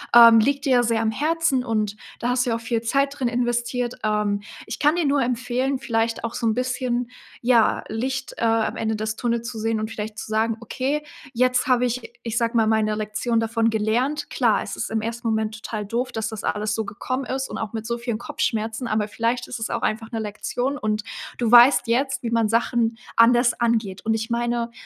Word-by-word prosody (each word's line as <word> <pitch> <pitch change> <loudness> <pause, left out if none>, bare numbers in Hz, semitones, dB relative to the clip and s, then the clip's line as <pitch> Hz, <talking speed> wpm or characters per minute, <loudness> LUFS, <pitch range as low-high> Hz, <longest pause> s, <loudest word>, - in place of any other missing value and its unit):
Ähm, 230 -1 +10
liegt 275 +5 +1
dir 270 - +2
ja 245 -1 +5
sehr 230 -1 +1
am 220 -1 +1
Herzen 305 0 +1
und 215 -4 -1 0.2
da 240 - -1
hast 245 0 +2
du - - -1
ja - - +1
auch 230 - -5
viel 230 0 -1
Zeit 275 +4 0
drin 255 - +1
investiert. 240 0 -1
Ähm, 210 -1 0 0.2
ich - - -6
kann 295 +2 +4
dir 350 -2 +1
nur 280 0 +2
empfehlen, 250 +2 0
vielleicht 225 -2 -1
auch 230 0 -3
so 230 - -1
'n 220 - +3
bisschen, 250 -1 -1 0.3
ja, 235 -2 +3
Licht, 260 +4 -3
äh, - - 0
am 225 -1 +1
Ende 220 0 -1
des 215 +1 -3
Tunnels 235 -1 -1
zu 230 -3 -6
sehen 225 0 0
und 215 +1 -4
vielleicht 215 -1 -5
zu - - -5
sagen: 220 +1 0
„Okay, 270 +5 -2 0.3
jetzt 250 +1 +2
habe 250 -1 +3
ich, 245 0 -3
ich 230 -1 -3
sage 230 0 +1
mal, 220 -1 +3
meine 215 -1 +2
Lektion 215 +2 -1
davon 225 0 +1
gelernt.“ 245 +7 0
Klar, 240 -8 +2
es - - -6
ist - - -3
im 220 0 -1
1. 230 +1 -4
Moment 220 -1 0
total 215 -2 -4
doof, 235 +5 -2
dass 220 0 -2
das 220 -2 -7
alles 210 +1 -1
so 220 - -1
gekommen 255 +6 -4
ist 265 +1 -2
und - - -5
auch 225 -1 -4
mit 220 -1 -4
so 235 +1 -2
vielen 235 -2 -2
Kopfschmerzen. 225 +1 -2
Aber 215 -1 0
vielleicht 230 +3 -1
ist - - -5
es 225 - -3
auch 235 - -2
einfach 225 +1 -2
'ne 225 - -2
Lektion 245 +6 -3
und 215 0 -1 0.3
du 235 -2 0
weißt 245 +3 +8
jetzt, 265 +4 0
wie 230 - -2
man 230 -2 +2
Sachen 230 0 +1 0.2
anders 240 +1 +5
angeht. 220 -5 0
Und 220 - +2
ich 220 +1 -3
meine, 235 0 -1
230 Hz, 220 wpm, -23 LUFS, 220-250 Hz, 0.3 s, Ähm